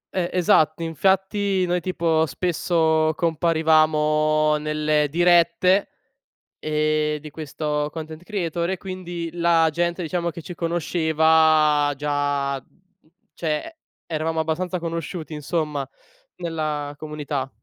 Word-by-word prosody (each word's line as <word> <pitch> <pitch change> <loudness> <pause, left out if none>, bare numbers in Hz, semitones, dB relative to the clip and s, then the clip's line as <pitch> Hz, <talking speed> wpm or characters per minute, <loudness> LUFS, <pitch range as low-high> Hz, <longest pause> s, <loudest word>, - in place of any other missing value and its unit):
E 175 -2 0
esatto, 165 -2 +3
infatti 190 +3 +1
noi 175 0 0
tipo 165 -3 +1
spesso 160 -1 +1
comparivamo 155 -2 +2
nelle 150 0 0
dirette, 175 +3 +3 0.7
ehm, 155 0 0
di 155 +1 -10
questo 150 0 -3
content 160 0 -7
creator 175 -4 -2
e - - 0
quindi 175 -3 -6
la 170 -1 +3
gente, 170 +3 -1
diciamo 170 0 -2
che 170 - -9
ci 175 - -8
conosceva 160 -3 +3
già 145 -1 -1
mhmm, - - -27 0.7
cioè 165 - -3 0.3
eravamo 160 0 -1
abbastanza 175 +3 -2
conosciuti, 165 -1 -5
insomma, 150 -2 -2 0.5
nella 155 -4 -3
comunità. 150 -3 -4
160 Hz, 105 wpm, -23 LUFS, 150-170 Hz, 0.7 s, esatto